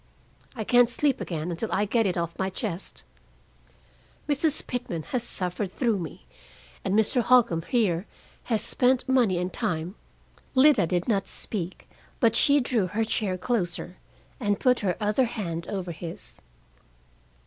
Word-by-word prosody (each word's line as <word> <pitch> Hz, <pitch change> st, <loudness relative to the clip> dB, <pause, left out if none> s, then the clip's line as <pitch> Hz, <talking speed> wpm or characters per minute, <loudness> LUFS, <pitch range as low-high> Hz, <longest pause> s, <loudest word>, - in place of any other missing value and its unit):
I 220 Hz, -, -3 dB
can't 245 Hz, +2 st, +5 dB
sleep 275 Hz, +2 st, +1 dB
again 165 Hz, 0 st, -3 dB
until 175 Hz, +7 st, -3 dB
I 205 Hz, -, +2 dB
get 225 Hz, +1 st, +2 dB
it 180 Hz, -, -1 dB
off 170 Hz, -1 st, -3 dB
my 190 Hz, 0 st, 0 dB
chest. 190 Hz, -2 st, -5 dB, 1.2 s
Mrs. 295 Hz, +1 st, 0 dB
Pitman 235 Hz, -10 st, -4 dB
has 250 Hz, -, -2 dB
suffered 185 Hz, -3 st, -3 dB
through 230 Hz, -2 st, 0 dB
me, 160 Hz, -, -7 dB, 0.6 s
and 195 Hz, 0 st, 0 dB
Mr. 220 Hz, +3 st, +3 dB
Holcombe 235 Hz, -9 st, +4 dB
here 200 Hz, -6 st, +1 dB, 0.4 s
has 225 Hz, -3 st, 0 dB
spent 255 Hz, 0 st, +2 dB
money 245 Hz, -8 st, +3 dB
and 180 Hz, 0 st, -2 dB
time 165 Hz, +2 st, -2 dB, 0.3 s
" -, -, -31 dB
Lida 260 Hz, -, +6 dB
did 175 Hz, +1 st, -1 dB
not 200 Hz, -4 st, +1 dB
speak, 185 Hz, -4 st, -5 dB, 0.3 s
but 230 Hz, -4 st, +3 dB
she 285 Hz, +3 st, +5 dB
drew 240 Hz, -7 st, 0 dB
her 220 Hz, +5 st, -1 dB
chair 200 Hz, -4 st, -1 dB
closer, 180 Hz, -5 st, -1 dB, 0.4 s
and 205 Hz, -4 st, 0 dB
put 250 Hz, -1 st, +3 dB
her 190 Hz, -4 st, -1 dB
other 215 Hz, +5 st, +2 dB
hand 170 Hz, -8 st, -4 dB
over 185 Hz, -3 st, -3 dB
his. 160 Hz, -, -9 dB
205 Hz, 150 wpm, -26 LUFS, 180-245 Hz, 1.2 s, Lida